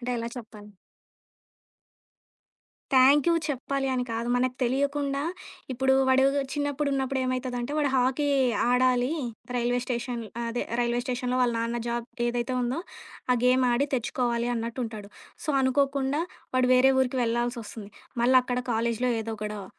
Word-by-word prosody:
అంటే 250 0 -4
ఎలా 230 0 -3
చెప్పాలి. 210 -3 -12 2.2
థ్యాంక్యూ 275 +5 +6 0.2
చెప్పాలి 275 0 -2
అని 250 -1 0
కాదు. 230 +1 -2
మనకు 255 0 0
తెలియకుండా 280 +2 0 0.5
ఇప్పుడు 265 +1 +2
వాడు 260 0 +5 0.3
చిన్నప్పుడున్నప్పుడేమైతదంటే 265 -3 -1
వాడు 285 -2 +1
హాకీ 260 +3 +1 0.4
ఆడాలి 250 0 +3 0.5
రైల్వే 245 +1 +1
స్టేషన్ 240 -1 -3 0.3
అదే 235 +1 -2 0.2
రైల్వే 240 0 +1
స్టేషన్‌లో 250 0 -1
వాళ్ళ 245 -1 +2
నాన్న 235 +1 -2
జాబ్ 235 0 -2 0.2
ఏదైతే 240 +1 -1
ఉందో, 250 +5 -1 0.5
ఆ - - +4
గేమ్ 255 +1 +4
ఆడి 260 +4 +2
తెచ్చుకోవాలి 240 0 -1
అన్నట్టు 230 +2 -4
ఉంటాడు. 215 -3 -7 0.4
సో, - - -10
అనుకోకుండా 275 +2 +1 0.3
వాడు 255 0 +3
వేరే 260 +1 +6
ఊరికి 260 0 0
వెళ్ళాల్సొస్తుంది. 235 -2 -3 0.3
మళ్ళక్కడ 250 0 +3
కాలేజిలో 235 +2 0
ఏదో 225 0 -4
గొడవ. 210 -1 -4
250 Hz, 125 wpm, -27 LUFS, 235-265 Hz, 2.2 s, థ్యాంక్యూ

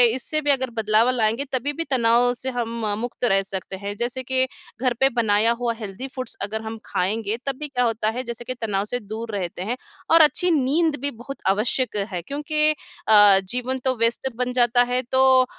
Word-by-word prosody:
इससे 285 +4 -2
भी 290 -1 +3
अगर 260 -2 0
बदलाव 220 +2 +3
लाएँगे 235 +1 +1
तभी 265 +3 0
भी 330 - -2
तनाव 240 -1 +4
से 260 +1 -4
हम 235 -2 -3
मुक्त 245 +1 -6
रह 195 -4 +3
सकते 190 0 -6
हैं। 200 +1 -5
जैसे 245 +3 -2
कि 260 0 +1 0.4
घर 255 -2 +2
पे 270 - +5
बनाया 225 -2 +2
हुआ 240 -1 0
हेल्दी 210 +4 -6
फूड्स 255 -1 -5
अगर 210 +2 -3
हम 220 0 -6
खाएँगे 210 +4 -1
तब 275 -1 -1
भी 300 - -4
क्या 250 -3 0
होता 225 -2 0
है 245 +3 -3
जैसे 235 -1 -6
कि 255 - -3
तनाव 205 -3 -1
से 245 +3 -3
दूर 220 +2 -6
रहते 180 -2 -4
हैं 235 +6 -3 0.3
और 330 0 +8
अच्छी 315 +4 +4
नींद 305 +2 +2
भी 285 +1 -1
बहुत 245 +4 -9
आवश्यक 215 +4 0 0.2
है 180 -2 -3
क्योंकि 300 - +1
अ, 205 -8 +4
जीवन 250 +1 -2
तो 260 -1 +2
व्यस्त 230 +3 +1
बन 250 +1 -2
जाता 245 0 +4
है 250 +1 0
तो 260 - +3 0.2
ओ, - - +2
240 Hz, 210 wpm, -23 LUFS, 220-260 Hz, 0.4 s, और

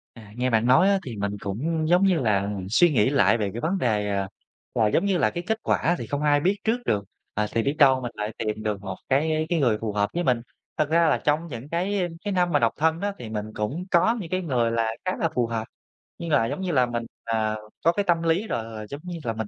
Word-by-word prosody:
À, 110 -3 -13
nghe 125 +1 0
bạn 115 0 +2
nói 160 +10 +5
á, 200 -1 +3
thì 120 -4 -5
mình 100 0 -2
cũng, 155 +11 -2
giống 180 +2 +4
như 190 -3 +3
là, 100 -5 +1 0.2
suy 175 - +5
nghĩ 115 -2 +3
lại 140 -4 +4
về 105 -3 -1
cái 120 - -5
vấn 175 +7 0
đề, 105 - 0
à, 100 -1 -1 0.5
là, 110 - +3
giống 105 - +1
như 195 -3 +1
là, 110 -9 +3
cái 175 - -4
kết 220 +2 0
quả 170 - +1
thì - - -5
không 145 0 -3
ai 145 -1 +3
biết 190 +6 +2
trước 230 +3 +1
được, 100 -1 +1 0.3
à, 105 0 0
thì 115 - +1
biết 140 +4 0
đâu 135 -3 +6
mình 120 -2 -4
lại 105 +1 -4
tìm 110 -1 -3
được 105 -2 -2
một 95 -2 -6
cái 155 +3 +1
cái 170 - +1
người 120 -7 +2
phù 110 -2 -2
hợp 105 0 0
với 175 +1 -1
mình. 125 -5 +2 0.4
Thật 155 -2 +1
ra 165 +1 +4
là 150 - +2
trong 150 +3 0
những 130 -3 -8
cái 180 +3 -1 0.2
cái 205 - -1
năm 180 -2 +2
mà - - +4
độc 115 -1 +2
thân 160 +2 +1
đó 205 0 -1
thì 120 - -7
mình 105 -1 -4
cũng 130 +12 -3
có 185 +7 +4
những 170 -5 -7
cái 185 - 0
người 125 -8 +1
là 115 -1 +1 0.2
khá 185 - -1
là 165 - 0
phù 120 -1 +1
hợp, 115 -1 -3 0.5
nhưng 170 - -5
là, 140 -6 +4
giống 150 - -3
như 185 -2 -1
là, 130 -5 +4
mình, 120 -1 -3 0.2
à, 110 -1 0 0.3
có 165 - +6
cái 205 +4 -1
tâm 170 -2 +2
lý 165 +6 +1
rồi. 110 - -4
Giống 140 +1 -7
như 175 -2 -6
là, 115 - -1
mình, 110 -1 -4
135 Hz, 270 wpm, -25 LUFS, 110-170 Hz, 0.5 s, đâu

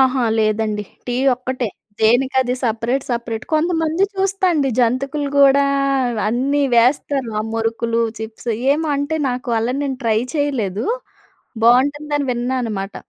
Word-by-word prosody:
అహా! 260 -1 +3 0.2
లేదండి. 215 -1 0 0.2
టీ 245 - -2 0.2
ఒక్కటే. 255 -2 -3 0.3
దేనికది 250 +3 +2
సెపరేట్, 235 +3 -1
సెపరేట్. 235 -2 -3
కొంతమంది 325 +2 +1
చూస్తా 390 0 0
అండి. 285 -4 +1
జంతుకలు 270 +4 0
కూడా, 280 0 +6 0.7
అన్నీ 275 +5 +1
వేస్తారు. 260 +1 +2
ఆ - - -1
మురుకులు, 230 +1 0 0.2
చిప్స్. 220 +2 -6 0.2
ఏమో 315 +2 -1
అంటే, 285 +3 -1
నాకు 250 0 -3
అలా 240 +3 -1
నేను 265 -2 -3
ట్రై 220 -1 +3 0.2
చేయలేదు. 245 -10 -1 0.8
బావుంటుందని 285 +4 +2
విన్నా 245 +2 -2
అనమాట. 205 -3 -4
255 Hz, 125 wpm, -19 LUFS, 230-285 Hz, 0.8 s, కూడా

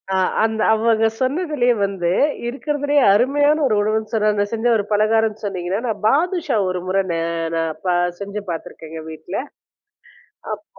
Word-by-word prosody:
அ - - +2 0.2
அந்த 220 0 0
அவங்க 225 0 +3
சொன்னதிலயே 275 -2 +1
வந்து 190 -3 -2 0.4
இருக்கிறதுலயே 290 +3 0
அருமையான 285 +7 +3
1 250 - +2
உணவுன்னு 215 +1 -1
சொன்ன 215 -2 +2
அந்த 205 -1 +1
செஞ்ச 230 0 -3
1 205 - -1
பலகாரனனு 215 +1 +2
சொன்னீங்கன்னா, 185 0 -2
நான் 215 -1 -3
பாதுஷா 335 - +1
1 185 0 -2
முறை 195 +1 +2
நே 170 - -1 0.4
நான் 165 -1 0
பா 180 - +2 0.3
செஞ்சு 200 +1 -5
பார்த்துருக்கேங்க 160 -1 -7
வீட்ல. 160 - -6 1.2
அப்போ - - -6
220 Hz, 145 wpm, -20 LUFS, 195-255 Hz, 1.2 s, அவங்க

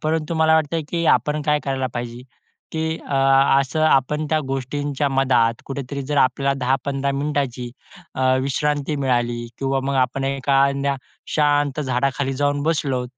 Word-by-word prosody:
परंतु 160 +1 -1
मला 160 0 +4
वाटतं, 160 +1 +1
की 170 -1 -1
आपण 150 0 +2
काय 150 0 +2
करायला 135 -1 -1
पाहिजे, 120 0 -5 0.5
की 160 0 -2
अ, 140 - 0 0.4
असं 140 +4 -1
आपण 150 +1 +2
त्या 155 - +3
गोष्टींच्या 140 +2 -2
मधात 130 -4 +2
कुठेतरी 140 0 -5
जर 145 +2 -3
आपल्याला 140 +1 +2
10-15 135 +2 0
मिनिटाची 135 -4 -2 0.4
अ, 130 - -2 0.2
विश्रांती 145 +2 -1
मिळाली 120 -3 0
किंवा 135 0 0
मग 140 - -1
आपण 130 +1 0
एखाद्या 140 0 +1 0.4
शांत 145 -1 +2
झाडाखाली 135 +1 -1
जाऊन 145 +1 0
बसलो, 140 -5 0
140 Hz, 140 wpm, -21 LUFS, 130-150 Hz, 0.5 s, मला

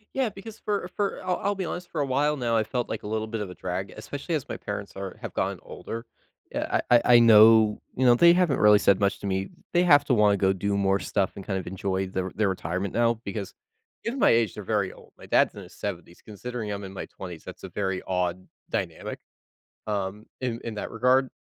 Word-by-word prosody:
Yeah, 260 -4 +1
because 210 +2 -10
for 205 -3 -2
for, 200 -1 -1
I'll 180 - +1
I'll 200 +1 +1
be 190 -2 -3
honest, 175 +1 -6
for 155 - -3
a 145 - +2
while 145 +3 +1
now, 120 -2 0
I 110 - +3
felt 120 +2 -2
like - - -5
a - - -6
little 110 0 -2
bit 110 -1 -4
of 100 - -4
a - - -8
drag, 95 +1 -4
especially 140 +9 -5
as 145 - -3
my - - -4
parents 100 -1 -6
are 95 -1 -6
have - - -6
gotten - - -1
older. 115 +1 -7 0.5
Yeah, - - 0
I 120 - +7
I - - +1
I - - +9
know, 110 -1 +7 0.2
you 130 - +2
know, 120 -1 +7
they 170 +5 +7
haven't 175 -6 +2
really 105 -1 +7
said 100 0 +3
much 100 - +1
to 100 - -5
me, 95 0 -1 0.2
they 175 - +4
have 145 -5 +6
to 130 - +2
wanna 105 -2 +4
go 95 0 +3
do 100 +2 -1
more 100 0 +2
stuff 100 -2 0
and 100 - -8
kind 95 -3 -1
of 90 - -8
enjoy 95 0 -2
their 95 0 -3
their 105 -1 +1
retirement 95 +1 -2
now 115 0 +3
because 100 -1 -5 0.5
in 240 +4 -2
my - - +5
age, 115 -4 +3
they're 105 - -7
very 100 -2 0
old, - - -17
my - - -13
dad's - - +3
in - - -9
his - - -14
70s, 90 -3 -6
considering 110 0 -5
I'm 100 -1 -4
in 95 - -9
my - - -6
20s, 90 -4 -9
that's - - -10
a - - -8
very 95 -2 -2
odd 90 0 -1 0.2
dynamic, - - -4 0.7
um, 105 +1 -3 0.2
in 120 -2 -2
in 115 -2 -5
that 105 - -5
regard, 125 +3 +3
105 Hz, 240 wpm, -26 LUFS, 95-125 Hz, 0.7 s, I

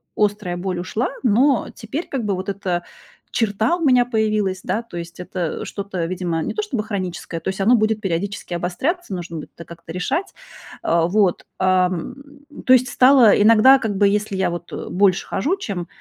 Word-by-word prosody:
острая 205 -4 0
боль 180 -1 -3
ушла, 215 +7 -2
но 250 +4 +3
теперь 275 +10 -5
как 265 -4 -3
бы 200 -2 0
вот 190 +2 -5
эта 180 -3 -2 0.5
черта 220 - +1
у - - -9
меня 250 -2 +5
появилась, 215 -5 0
да. 220 - -1
То 175 -7 -9
есть 170 +1 -8
это 180 -2 -4
что-то, 195 -4 -4
видимо, 175 -2 -2
не - - -3
то 425 - -1
чтобы 245 - -3
хроническое, 185 -5 -4
то 190 - -3
есть 190 - -4
оно 235 +5 +5
будет 215 -1 +1
периодически 195 0 -3
обостряться, 200 - -2
нужно 170 -2 -5
будет 155 - -9
как-то 170 0 -11
решать. 180 - -2 0.5
А, 165 0 +2
вот, 195 -1 +1
ам, 185 -2 +1 0.5
то - - +3
есть 255 0 +5
стало 255 -5 +6
иногда, 230 +5 +7
как 210 -5 -2
бы, 205 - +4
если 205 -1 0
я 190 -2 +1
вот 175 0 -7 0.2
больше 190 0 +2
хожу, 310 - -1
чем, 195 - -5
200 Hz, 180 wpm, -21 LUFS, 180-225 Hz, 0.5 s, иногда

